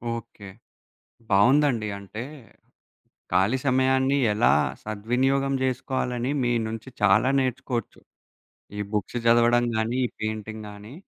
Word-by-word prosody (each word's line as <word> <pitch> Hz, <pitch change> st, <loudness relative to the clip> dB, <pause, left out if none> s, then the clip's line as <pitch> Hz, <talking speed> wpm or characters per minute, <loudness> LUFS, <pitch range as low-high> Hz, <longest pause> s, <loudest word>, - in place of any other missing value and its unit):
Okay. 115 Hz, -4 st, -10 dB, 0.8 s
బావుందండి. 120 Hz, +2 st, +3 dB
అంటే, 105 Hz, +3 st, -8 dB, 1.1 s
ఖాళీ 105 Hz, +8 st, +2 dB
సమయాన్ని 130 Hz, +1 st, +2 dB, 0.2 s
ఎలా 105 Hz, -, +3 dB, 0.3 s
సద్వినియోగం 130 Hz, +6 st, 0 dB
జేసుకోవాలని 130 Hz, -1 st, -2 dB
మీ 120 Hz, -1 st, +1 dB, 0.2 s
నుంచి 115 Hz, +3 st, -7 dB
చాలా 105 Hz, +5 st, +4 dB
నేర్చుకోవచ్చు. 125 Hz, -2 st, -3 dB, 0.8 s
ఈ -, -, -4 dB
బుక్సు 105 Hz, +2 st, -2 dB
జదవడం 120 Hz, +1 st, +4 dB
గాని, 115 Hz, +3 st, -1 dB
ఈ -, -, 0 dB
పెయింటింగ్ 110 Hz, 0 st, -5 dB
గాని. 105 Hz, +3 st, -11 dB
120 Hz, 105 wpm, -25 LUFS, 110-130 Hz, 1.1 s, చాలా